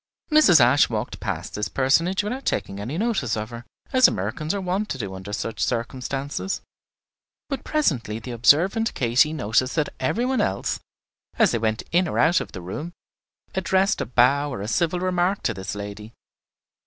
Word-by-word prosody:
Mrs. 305 - +7
Ashe 125 +4 +5
walked 110 -2 -4
past - - -4
this 105 +1 -2
personage 165 +9 +2
without 250 +6 -4
taking 100 0 -2
any 120 +10 -4
notice 200 - 0
of 110 +2 -5
her, 120 0 -8 0.3
as 255 -1 +7
Americans 110 - -2
are 200 - -2
wont 190 +3 -2
to - - -3
do 100 -6 -5
under 95 +2 -8
such 105 0 -3
circumstances; 135 +8 -3 0.9
but 275 -2 -3
presently 140 - 0
the 120 +2 -7
observant 170 - +3
Katy 125 +5 +3
noticed 130 -3 0
that 155 -3 -1
every 225 - 0
one 255 -3 +1
else, 95 - -1 0.6
as - - +4
they 115 - 0
went 110 0 -1
in 175 +1 +3
or - - -3
out 165 +3 +4
of - - -7
the 90 - -7
room, 150 - -6 0.6
addressed 190 +2 +1
a - - -3
bow 135 +4 +3
or 100 - -5
a - - -4
civil 170 +8 0
remark 185 +1 0
to 115 - 0
this 95 +1 -6
lady. 105 +2 -7
135 Hz, 180 wpm, -24 LUFS, 110-185 Hz, 0.9 s, Mrs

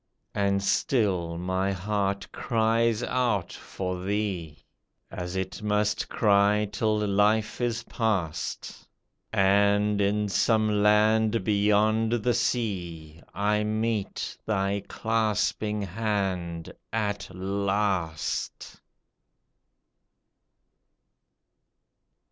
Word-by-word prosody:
And 100 -1 +1
still 95 -8 +1
my 95 +2 -1
heart 100 +1 -2
cries 115 0 +1
out 120 -8 0
for 90 -1 -5
thee. 95 - -3 0.5
As 90 0 -5
it 95 +2 -4
must 105 0 0
cry 105 0 +3
till 110 +1 +1
life 105 +3 +2
is 120 -1 -1
past. 95 -9 -3 0.4
And 100 +1 +3
in 105 +1 +1
some 110 0 +2
land 110 +1 +3
beyond 105 +2 +2
the 120 +1 +1
sea 85 -11 -2
I 105 +2 +1
meet 110 -1 -2
thy 100 -1 0
clasping 110 -1 0
hand 95 -4 -2 0.2
at 105 -2 -2
last 95 -3 -2
105 Hz, 80 wpm, -27 LUFS, 95-110 Hz, 0.5 s, cry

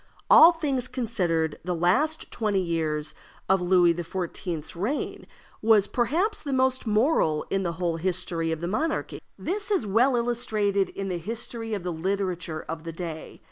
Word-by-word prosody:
All 330 - +10
things 280 -7 -1
considered, 175 - -1
the 180 0 -2
last 270 - +1
twenty 210 -3 0
years 160 -4 -1 0.3
of 190 -1 +3
Louis 175 -1 +4
XIV.'s 170 -2 -5
reign 215 - -3 0.3
was 215 -2 +5
perhaps 330 - 0
the 285 - -4
most 260 -1 +1
moral 210 - +2
in 195 - +1
the 170 -3 -2
whole 170 -1 -1
history 170 -2 -1
of 160 0 -3
the 170 - -2
monarchy. 310 - -2 0.2
This 405 +3 -3
is 390 - +1
well 235 +6 +3
illustrated 215 -5 0
in 195 -1 -5
the 180 -2 -2
history 225 +3 -5
of 195 - -5
the 180 -1 -2
literature 180 -2 -2
of 160 0 -5
the 165 - -5
day. 165 -2 -7
195 Hz, 160 wpm, -26 LUFS, 170-240 Hz, 0.3 s, All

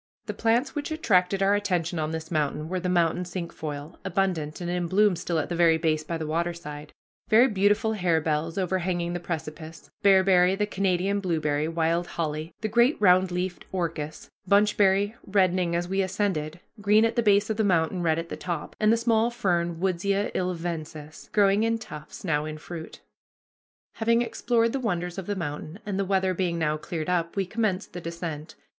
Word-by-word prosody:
The - - -4
plants 235 +4 +1
which 290 -1 -3
attracted 195 - +2
our 195 +1 +4
attention 180 -5 0
on 155 -1 -1
this 160 +1 -5
mountain 150 0 -1
were 185 0 -1
the 180 +1 -2
mountain 175 0 +2
cinquefoil, 165 -4 -6
abundant 190 -6 -1
and 175 - -4
in 175 0 -1
bloom 200 +2 +3
still 170 0 -2
at 155 - -1
the 175 - -3
very 165 -1 +4
base 155 -1 0
by 165 +2 -3
the 160 - -4
waterside, 155 -2 -4 0.4
very 235 +4 +6
beautiful 205 0 +2
harebells 165 -4 0
overhanging 180 -2 -1
the 175 - -2
precipice, 160 -1 -7
bearberry, 190 -2 +5
the 210 +1 0
Canada 195 -1 0
blueberry, 155 -4 0
wild 165 +1 0
holly, 155 0 -3
the 215 - 0
great 240 +6 +3
round 185 -2 +5
leafed 180 0 -3
orchis, 160 -4 -4 0.2
bunchberry, 205 0 +3
reddening 185 -3 +2
as 175 +1 -1
we 195 +1 0
ascended, 185 -5 -2 0.2
green 210 +2 +5
at 230 - 0
the 235 - +3
base 205 0 +3
of 215 - -2
the 220 - +2
mountain, 180 -2 +1
red 160 -2 +2
at 165 0 -4
the - - -4
top, 170 -4 -5
and 215 0 +4
the 230 - +4
small 230 0 +2
fern 175 -8 -1
Woodsia 195 +2 0
ilvensis, 165 -4 -4
growing 200 0 +4
in 230 0 +1
tufts, 150 -9 -10
now 150 -4 0
in 155 0 -5
fruit. 160 +1 -9 1.0
Having 230 +1 +3
explored 230 -1 0
the 275 - -1
wonders 180 -6 -2
of 190 - -7
the 205 - -1
mountain, 155 -1 -5
and 200 -2 -2
the 195 - +1
weather 190 -1 +1
being 175 -2 -1
now 155 -2 +1
cleared 155 0 -5
up, 170 -2 0
we 195 -1 0
commenced 205 -1 -2
the 175 - -6
descent. 165 -2 -6
180 Hz, 185 wpm, -26 LUFS, 165-200 Hz, 1.0 s, very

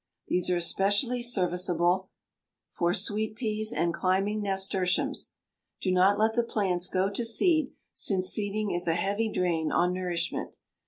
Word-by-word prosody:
These 180 0 +1
are 180 - +2
especially 205 +8 +1
serviceable 180 -4 +1 0.6
for 170 0 0
sweet 215 +2 0
peas 215 -2 -1
and 170 -8 0
climbing 195 +4 0
nasturtiums. 190 -2 -1 0.5
Do 185 - -1
not 185 +2 +4
let 220 +1 +2
the 235 - +2
plants 190 -6 -1
go 185 +1 0
to 235 - -1
seed, 310 +5 +2 0.2
since 185 -2 +1
seeding 210 0 -1
is 175 0 -1
a 165 - +2
heavy 205 +5 -1
drain 170 -5 0
on 180 +1 +2
nourishment. 180 -2 -3
195 Hz, 145 wpm, -28 LUFS, 180-215 Hz, 0.6 s, not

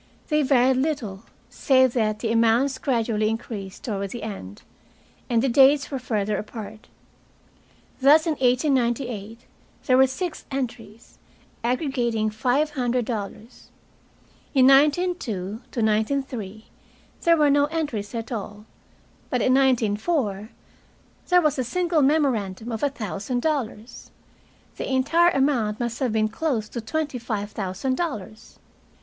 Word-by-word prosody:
They 305 -1 +2
varied 260 -2 +3
little, 250 -8 -2 0.2
save 260 0 +3
that 215 -3 0
the 225 - -1
amounts 230 +4 +2
gradually 225 -5 0
increased 215 -4 -6
toward 200 -5 -3
the 235 +2 -7
end, 105 - -8 0.7
and 235 -1 +2
the - - +2
dates 275 +3 +4
were 270 - -2
further 210 -4 -1
apart. 215 0 -8 1.1
Thus, 295 +4 +6
in 330 - +1
1898 245 -5 0 0.4
there 255 -2 +4
were 265 0 +6
six 310 +6 -5
entries, 230 -4 -6 0.4
aggregating 240 -4 0
five 255 +8 0
hundred 250 -3 -1
dollars. 215 +1 -7 0.9
In 260 -1 +6
1902 270 - +2
1903 220 -1 -1 0.6
there 335 -1 +4
were 295 -2 +4
no 285 0 +4
entries 285 -10 -3
at 230 +1 -5
all, 210 -2 -6 0.6
but 250 - 0
in 255 - +3
1904 230 - +1 0.8
there 360 -1 +5
was 300 -3 +1
a - - +1
single 340 +4 0
memorandum 245 -8 +1
of 225 - -4
a 285 - +2
thousand 230 0 -4
dollars. 255 -7 -3 0.7
The - - -4
entire 330 +7 +3
amount 265 -9 +1
must 235 -1 -3
have 260 -4 0
been 215 -1 +2
close 225 -1 -2
to 235 - -5
twenty 290 +2 -3
five 215 -3 -4
thousand 205 +7 -3
dollars. 220 - -5
245 Hz, 130 wpm, -24 LUFS, 215-275 Hz, 1.1 s, Thus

